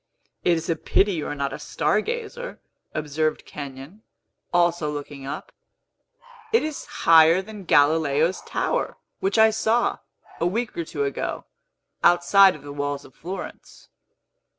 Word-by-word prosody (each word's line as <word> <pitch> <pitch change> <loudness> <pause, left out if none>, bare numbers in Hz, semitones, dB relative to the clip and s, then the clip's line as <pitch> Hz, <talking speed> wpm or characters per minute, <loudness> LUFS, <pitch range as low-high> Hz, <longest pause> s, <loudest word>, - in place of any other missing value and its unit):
"It 175 - +4
is 165 - -5
a 165 - +1
pity 200 +5 +2
you 160 -5 -3
are - - -4
not 140 -1 -2
a 135 - -6
star 155 +6 0
gazer," 475 - -5 0.3
observed 155 +1 -2
Kenyon, 140 +7 -9 0.5
also 175 -3 +2
looking 145 -2 -7
up. - - -6 1.0
"It 455 - +4
is 310 -2 -4 0.2
higher 165 +1 +7
than 210 -2 -10
Galileo's 155 +3 +3
tower, - - -2 0.2
which 385 -7 0
I 220 0 +6
saw, 220 +2 +1 0.4
a 170 - +2
week 225 +5 -2
or 170 - -3
two 145 -2 -3
ago, 140 - -3 0.6
outside 185 +2 +6
of 145 - -13
the 145 0 -8
walls 145 0 -3
of - - -16
Florence." 185 +4 -9
165 Hz, 145 wpm, -24 LUFS, 145-205 Hz, 1.0 s, higher